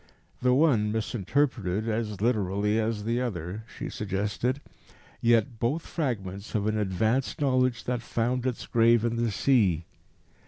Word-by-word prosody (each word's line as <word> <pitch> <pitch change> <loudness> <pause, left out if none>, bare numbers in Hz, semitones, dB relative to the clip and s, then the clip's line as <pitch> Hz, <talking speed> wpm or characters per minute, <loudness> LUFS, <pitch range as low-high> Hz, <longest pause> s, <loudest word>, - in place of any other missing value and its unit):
"The 125 0 +4
one 125 -8 +3
misinterpreted 110 -2 0
as 110 -3 -2
literally 105 -2 +1
as 110 -1 -1
the 115 +3 0
other," 100 -2 -4
she - - -4
suggested, 105 +6 -2 0.6
"yet 115 0 +2
both 145 +8 0
fragments 100 - -3
of 105 -1 +1
an 110 0 +1
advanced 110 +5 0
knowledge 130 -4 +2
that 125 -1 -2
found 120 +2 -1
its 125 - -3
grave 115 0 +4
in 115 0 0
the 120 0 +1
sea. 100 - +2
115 Hz, 140 wpm, -27 LUFS, 105-125 Hz, 0.6 s, The